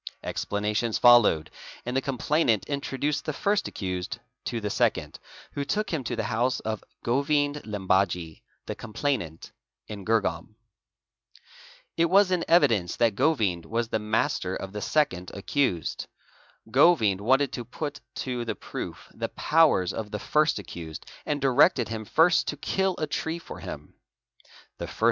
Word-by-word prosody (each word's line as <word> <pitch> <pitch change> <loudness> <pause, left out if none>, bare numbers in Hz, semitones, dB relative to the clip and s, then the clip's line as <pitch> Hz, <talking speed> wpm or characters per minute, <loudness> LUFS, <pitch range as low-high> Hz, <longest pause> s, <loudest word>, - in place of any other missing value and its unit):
Explanations 105 +2 -1
followed, 120 -10 +5 0.3
and 125 +1 -3
the 135 - +2
complainant 135 -3 +1
"introduced 140 +1 -2
the 155 - -2
first 200 +7 0
accused 90 -2 -4 0.3
to 120 - -2
the 105 -2 -3
second, - - 0 0.3
who 145 - -3
took 210 +8 -1
him 155 -5 -1
to 120 - -3
the 110 - -2
house 120 +2 0
of 110 -1 -4
| - - -51
Govind 145 +3 +1
Limbaji, 95 -5 0 0.2
the - - -3
complainant, 110 - -3 0.4
in 105 -2 -7
Girgaum. 105 -3 0 1.4
It 165 - +4
was 190 +2 +4
in 180 -2 +1
evidence 120 - +3
that 115 -3 +3
Go 145 +10 +3
vind 90 - 0
was 115 0 -1
the 110 - 0
master 105 -2 0
of 95 0 -6
the 105 - -4
second 95 - 0
accused. 100 - -1 0.6
Govind 120 - +4
wanted 135 +5 +3
to 120 - -4
put 145 +5 -6
to; 125 -2 -3
ie 115 -2 -2
proof - - -7
the - - -3
powers 150 - +3
of 110 -2 -4
the 105 - -3
first 150 +8 +2
accused 85 -5 -8 0.2
and 145 -1 0
directed 135 - +4
him 110 -1 -4
first 160 +10 +4
to 150 - -2
kill 190 +5 0
a 155 - -1
tree 160 +2 -3
for 170 - -9
him. - - -8 0.9
'The - - -4
first. - - -11
120 Hz, 155 wpm, -27 LUFS, 105-145 Hz, 1.4 s, followed